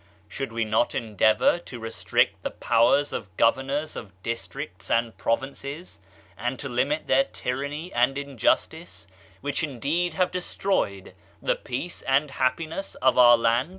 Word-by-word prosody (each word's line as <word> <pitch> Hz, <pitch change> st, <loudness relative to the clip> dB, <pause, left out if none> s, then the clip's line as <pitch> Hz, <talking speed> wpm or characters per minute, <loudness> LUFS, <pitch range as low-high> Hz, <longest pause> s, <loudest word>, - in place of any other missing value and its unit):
Should 135 Hz, +5 st, -5 dB
we 115 Hz, 0 st, -1 dB
not 110 Hz, +2 st, +1 dB
endeavor 110 Hz, -, +3 dB
to 125 Hz, -7 st, -9 dB
restrict 115 Hz, 0 st, 0 dB
the -, -, -2 dB
powers 120 Hz, +5 st, +2 dB
of 95 Hz, -2 st, -6 dB
governors 135 Hz, +6 st, +1 dB
of 95 Hz, -4 st, -9 dB
districts 95 Hz, -4 st, -5 dB
and 115 Hz, -1 st, +1 dB
provinces, 140 Hz, -, -3 dB, 0.4 s
and 125 Hz, +2 st, -3 dB
to 140 Hz, -, -5 dB
limit 140 Hz, +5 st, 0 dB
their 135 Hz, +1 st, +4 dB
tyranny 140 Hz, +7 st, -4 dB
and 125 Hz, +3 st, +2 dB
injustice, 140 Hz, -, -1 dB, 0.4 s
which 145 Hz, -1 st, -1 dB
indeed 160 Hz, +4 st, -1 dB
have 185 Hz, -1 st, +1 dB
destroyed 180 Hz, -, -1 dB, 0.3 s
the -, -, +1 dB
peace 135 Hz, +8 st, -5 dB
and 135 Hz, +2 st, +1 dB
happiness 160 Hz, +8 st, -2 dB
of 130 Hz, -1 st, +3 dB
our 120 Hz, -1 st, +8 dB
land? 115 Hz, +5 st, +2 dB
130 Hz, 140 wpm, -26 LUFS, 115-145 Hz, 0.4 s, our